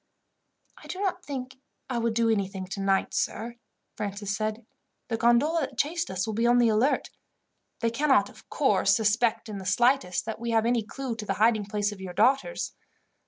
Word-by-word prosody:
"I - - -14
do 370 - -6
not 375 -2 -1
think 265 -2 -6 0.3
I 250 -2 -2
would 230 -1 0
do 230 0 +3
anything 195 -2 -2
tonight, 195 0 0
sir," 235 +3 -2 0.4
Francis 200 -1 -3
said. 215 +1 -3 0.4
"The 225 - -1
gondola 240 +8 +3
that 270 -3 -5
chased 330 +5 0
us 185 0 -2
will 220 - -3
be 230 +3 +1
on 240 0 +5
the 240 -1 +4
alert. 225 +6 +1 0.7
They 230 -1 +1
cannot, 265 -5 +3
of - - -17
course, - - +3
suspect 225 +1 +1
in 205 -2 -6
the - - -8
slightest 240 -1 +2
that 220 -1 -5
we 235 +1 -4
have 225 -1 +2
any 240 0 +2
clue 250 +2 -5
to 215 - -5
the 195 - 0
hiding 215 -1 +2
place 205 0 -1
of 200 -2 -9
your 185 -2 -6
daughters. 270 - +1
230 Hz, 190 wpm, -27 LUFS, 205-250 Hz, 0.7 s, on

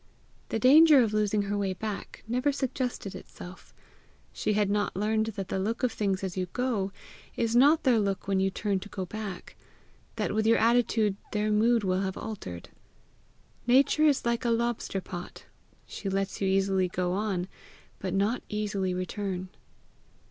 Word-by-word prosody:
The - - -1
danger 285 +3 +7
of 215 -2 -1
losing 210 -1 +1
her 200 +1 -2
way 200 -2 -1
back 210 +2 -6
never 250 +5 +1
suggested 255 -6 -3
itself. 185 0 -11 0.6
She 210 - -1
had 205 -1 +2
not 205 +1 0
learned 215 +2 +1
that 195 -2 -4
the 190 - -1
look 220 +6 -2
of 250 - +2
things 195 -3 -1
as 185 -2 -3
you 185 -1 -2
go, 230 -6 -1 0.4
is 230 0 0
not 290 +6 +5
their 250 -4 +4
look 195 -2 -2
when 195 -1 +1
you 190 0 +2
turn 200 0 -1
to 205 +2 -10
go 190 -2 -4
back; 205 -1 -7 0.6
that - - -1
with 220 0 +1
your 230 - +5
attitude 225 -3 +2 0.2
their 210 0 0
mood 225 +2 +3
will 185 0 +1
have 190 -1 -3
altered. 90 - -7 1.0
Nature 275 +5 +4
is 280 -4 +2
like 235 +1 0
a 240 - +1
lobster 230 -4 -1
pot: 175 -1 -8 0.4
she 200 - -5
lets 195 +1 -2
you 195 - +1
easily 190 -1 +2
go 180 0 -2
on, 190 -3 -1 0.5
but 190 - -3
not 210 +5 +1
easily 200 -3 -1
return. 185 0 -4
205 Hz, 170 wpm, -28 LUFS, 190-230 Hz, 1.0 s, danger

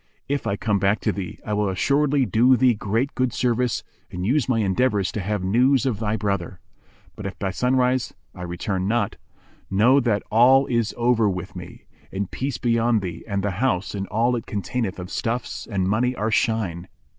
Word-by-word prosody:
If 140 0 -2
I 100 - 0
come 105 -1 0
back 100 +3 +2
to - - +1
thee, 95 -3 -6
I 105 - -2
will 105 -1 +1
assuredly 140 +8 +2
do 120 +5 +4
thee 125 +1 +4
great 115 +6 -1
good 130 -1 0
service 125 0 0 0.3
and 90 +1 -5
use 135 +4 +1
my 125 - +2
endeavours 105 -1 +1
to 105 - -3
have 100 0 -2
news 125 +7 +3
of 120 -6 -1
thy 110 0 -1
brother; 100 -4 -2 0.6
but 105 - -5
if 100 - -7
by 95 -1 -2
sunrise 125 +3 +1 0.2
I 90 - -10
return 95 +2 -3
not, 120 +3 0 0.5
know 115 +8 +4
that 115 -6 0
all 130 +5 +6
is 115 -3 0
over 120 -3 +3
with 95 0 -5
me; 90 -1 -10 0.3
and 95 0 -3
peace 135 -1 -3
be 115 -1 +1
on 115 -1 +2
thee, 85 -3 -6
and 100 -2 -2
the 100 - 0
house 100 -8 0
and 100 -1 -4
all 120 +4 +1
it 115 - -5
containeth 105 0 -3
of 90 -1 -7
stuffs 120 +2 -3
and 95 -4 -1
money 120 +5 +1
are 110 0 -1
shine." 100 -6 0
110 Hz, 195 wpm, -23 LUFS, 95-125 Hz, 0.6 s, all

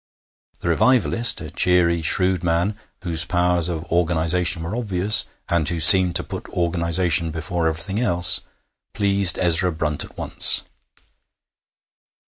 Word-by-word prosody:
The - - -5
revivalist, 115 - +1
a - - -10
cheery, 85 -2 +1
shrewd 90 +2 -1
man, 85 +5 -2 0.3
whose 80 -3 -2
powers 90 0 -1
of 80 -2 -6
organization 85 0 0
were 85 +7 -7
obvious, 105 -3 +1 0.2
and 85 -3 -2
who 85 -1 -5
seemed 90 +1 +7
to - - +1
put - - -10
organization 85 -1 -1
before 80 +1 -5
everything 80 +6 -5
else, 90 -7 +2 0.5
pleased 100 -3 +3
Ezra 90 +1 0
Brunt 75 -2 -4
at - - -16
once. - - +3
85 Hz, 125 wpm, -19 LUFS, 85-95 Hz, 0.5 s, seemed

